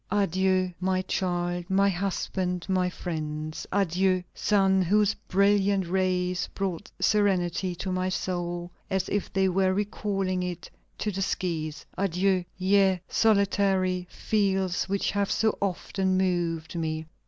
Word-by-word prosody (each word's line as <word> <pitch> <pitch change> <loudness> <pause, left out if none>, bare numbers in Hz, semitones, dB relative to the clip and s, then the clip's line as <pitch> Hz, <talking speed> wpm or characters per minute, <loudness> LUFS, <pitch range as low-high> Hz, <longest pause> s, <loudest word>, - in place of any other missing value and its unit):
"Adieu! 185 -2 +1
my 185 0 0
child, 175 -1 -2
my 195 +1 +4
husband, 180 -1 -2
my 185 -1 +1
friends. 155 -3 -5
Adieu! 185 -1 +2
sun 195 -2 +3
whose 205 +3 +3
brilliant 200 0 +3
rays 180 0 0
brought 190 -4 -3
serenity 185 -3 +1
to 185 +2 -4
my 185 0 0
soul, 175 -2 -3 0.2
as 190 -1 0
if 205 - -2
they 190 0 +2
were 185 0 +2
recalling 195 -2 -1
it 180 -1 -5 0.3
to 210 - -2
the 195 0 -3
skies. 160 -5 -2
Adieu! 190 0 +1
ye 190 0 +3
solitary 195 -4 +2
fields 190 -4 0
which 200 0 0
have 200 -1 0
so 220 -1 +2
often 190 0 0
moved 175 -3 0
me." 160 -1 -2
185 Hz, 125 wpm, -27 LUFS, 180-195 Hz, 0.3 s, my